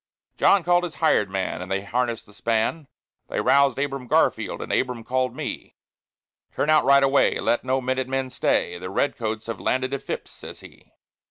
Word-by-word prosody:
John 200 -3 +4
called 175 +1 +3
his 175 -3 -5
hired 130 - +2
man, 95 -1 -3
and 90 +1 -7
they 95 0 -1
harnessed 120 +2 -2
the 105 - -19
span; 115 +9 -1 0.4
They - - -3
roused 140 -2 +3
Abram 135 -2 -3
Garfield, - - +1
and - - -4
Abram 125 -3 -1
called 130 +1 -1
me: - - -6 0.8
"Turn 155 - +1
out 155 - +4
right 140 0 +6
away; 135 +1 +3
let 120 - +1
no 130 +1 0
minute 130 0 -1
man 130 0 -2
stay; 90 - 0
The 90 - -6
Red 140 +9 0
Coats 110 -1 -4
have 115 - -5
landed 130 +1 -1
at 140 - -3
Phips's," - - -6
says - - -11
he. - - -16
130 Hz, 190 wpm, -24 LUFS, 115-140 Hz, 0.8 s, right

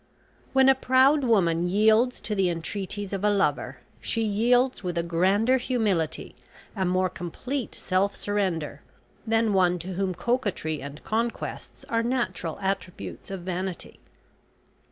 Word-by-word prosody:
When 265 0 +5
a 270 - +8
proud 265 +3 +4
woman 175 -7 +2
yields 220 +5 +3
to 215 - -3
the 195 -3 +2
entreaties 195 +4 -4
of 195 0 -3
a 210 - +4
lover, 200 -1 0 0.2
she 225 - -1
yields 240 +4 +2
with 175 -1 -3
a 170 - +1
grander 190 +9 +2
humility, 215 -10 -1 0.4
a 190 -2 0
more 185 +1 +2
complete 220 - -5
self 195 +2 0
surrender, 175 -8 -2 0.5
than 225 -1 +2
one 180 -2 +3
to 180 +2 -6
whom 185 0 -1
coquetry 205 - -1
and 140 +2 -9
conquests 230 +2 -3
are 230 0 +1
natural 230 -9 -2
attributes 180 - -4
of 195 -2 -5
vanity. 185 0 -4
195 Hz, 135 wpm, -26 LUFS, 180-230 Hz, 0.5 s, a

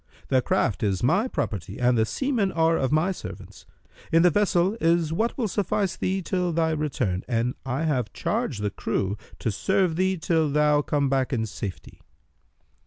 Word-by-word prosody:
The 130 -2 +3
craft 110 - 0
is 100 -2 0
my 190 - +3
property 100 - -4
and 125 0 +3
the 110 -1 +2
seamen 245 - 0
are 165 0 +2
of 130 -4 0
my 155 +5 +2
servants. 185 - -9 0.4
In 165 +1 +5
the 180 - +5
vessel 195 +1 +2
is 165 -1 +2
what 225 +7 -1
will 240 -5 0
suffice 195 -1 -1
thee 190 0 -1
till 180 0 -1
thy 160 0 +1
return, 135 - -1
and 120 0 0
I 135 +5 -1
have 130 -9 0
charged 185 - -2
the 105 - 0
crew 100 0 -2 0.2
to 115 - -2
serve 185 - +1
thee 190 +1 +1
till 160 -2 +1
thou 150 0 +3
come 145 -1 0
back 135 -1 0
in 115 -4 0
safety." 100 -3 -7
155 Hz, 175 wpm, -25 LUFS, 125-185 Hz, 0.4 s, In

